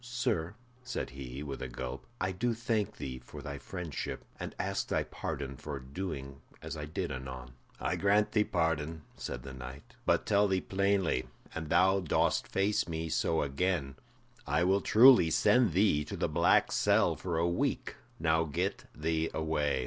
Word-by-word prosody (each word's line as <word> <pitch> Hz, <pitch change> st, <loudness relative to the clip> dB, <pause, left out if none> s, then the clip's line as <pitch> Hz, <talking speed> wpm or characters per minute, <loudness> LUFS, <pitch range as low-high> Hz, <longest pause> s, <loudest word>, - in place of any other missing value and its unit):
"Sir," 120 Hz, -7 st, -1 dB, 0.3 s
said 125 Hz, -, -4 dB
he, 65 Hz, +1 st, -7 dB
with 70 Hz, -2 st, -6 dB
a 65 Hz, -, -3 dB
gulp, 60 Hz, +1 st, -6 dB
"I 95 Hz, 0 st, 0 dB
do 115 Hz, +6 st, 0 dB
thank 110 Hz, -3 st, -1 dB
thee 65 Hz, -3 st, -5 dB
for -, -, -10 dB
thy 70 Hz, -1 st, -5 dB
friendship, 85 Hz, -1 st, -5 dB
and -, -, -5 dB
ask -, -, -1 dB
thy -, -, +1 dB
pardon 65 Hz, 0 st, -5 dB
for 75 Hz, 0 st, -5 dB
doing 70 Hz, -1 st, -6 dB, 0.2 s
as -, -, -6 dB
I 75 Hz, -1 st, -5 dB
did 75 Hz, -, -3 dB
anon." 65 Hz, -1 st, -6 dB, 0.3 s
"I -, -, -1 dB
grant 105 Hz, +1 st, +3 dB
thee 105 Hz, -, +3 dB
pardon," 80 Hz, -3 st, -1 dB
said -, -, -5 dB
the 70 Hz, -, -8 dB
knight, 65 Hz, +2 st, -9 dB
"but -, -, +3 dB
tell 105 Hz, 0 st, +4 dB
thee 95 Hz, -1 st, +2 dB
plainly, 95 Hz, -8 st, +1 dB, 0.3 s
an 80 Hz, -1 st, -4 dB
thou 95 Hz, +5 st, +4 dB
dost 90 Hz, -5 st, +1 dB
face 100 Hz, 0 st, +1 dB
me 80 Hz, -1 st, -3 dB
so 80 Hz, 0 st, +1 dB
again, 70 Hz, -1 st, -1 dB, 0.5 s
I -, -, +2 dB
will 95 Hz, +2 st, +3 dB
truly 120 Hz, -6 st, +7 dB
send 105 Hz, +7 st, +4 dB
thee 90 Hz, -5 st, +3 dB
to -, -, -6 dB
the -, -, +1 dB
black -, -, +3 dB
cell -, -, +3 dB
for 85 Hz, -3 st, -3 dB
a 85 Hz, +1 st, +2 dB
week. 85 Hz, +1 st, -1 dB, 0.2 s
Now 80 Hz, +1 st, +2 dB
get 70 Hz, -3 st, -2 dB
thee 80 Hz, +1 st, 0 dB
away." 75 Hz, -3 st, 0 dB
80 Hz, 170 wpm, -31 LUFS, 70-95 Hz, 0.5 s, truly